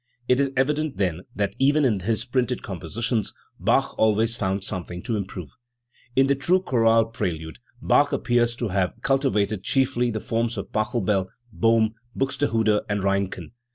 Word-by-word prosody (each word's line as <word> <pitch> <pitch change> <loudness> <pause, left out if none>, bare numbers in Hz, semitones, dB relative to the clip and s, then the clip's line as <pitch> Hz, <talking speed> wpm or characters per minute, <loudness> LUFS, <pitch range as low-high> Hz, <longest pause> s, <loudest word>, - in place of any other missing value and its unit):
It 125 +1 +3
is 140 -1 +2
evident, 150 +2 0
then, 90 -2 -1
that 100 -1 -1
even 145 +2 +4
in 110 -6 +2
his 110 +4 -1
printed 125 -1 -1
compositions 105 +6 -2 0.2
Bach - - +2
always 110 +1 +3
found 95 -2 -1
something 90 -2 -5
to 115 - -2
improve. 95 -6 -5 0.7
In 135 - +5
the 140 - +3
true 170 +7 +2
chorale 115 -9 +3
prelude, 80 -7 -4 0.2
Bach 145 0 +4
appears 120 -1 +1
to 120 -2 -3
have 95 -1 0
culti* 135 0 +2
vated 100 -1 0
chiefly 125 -2 +1
the 110 -2 -2
forms 115 +2 -1
of - - -6
Pachelbel, 105 -3 0 0.3
Bohm, 115 -1 +3 0.2
Buxtehude, 115 -6 +1
and 100 -1 -1
Reinken. 100 -4 -1
115 Hz, 155 wpm, -24 LUFS, 100-125 Hz, 0.7 s, In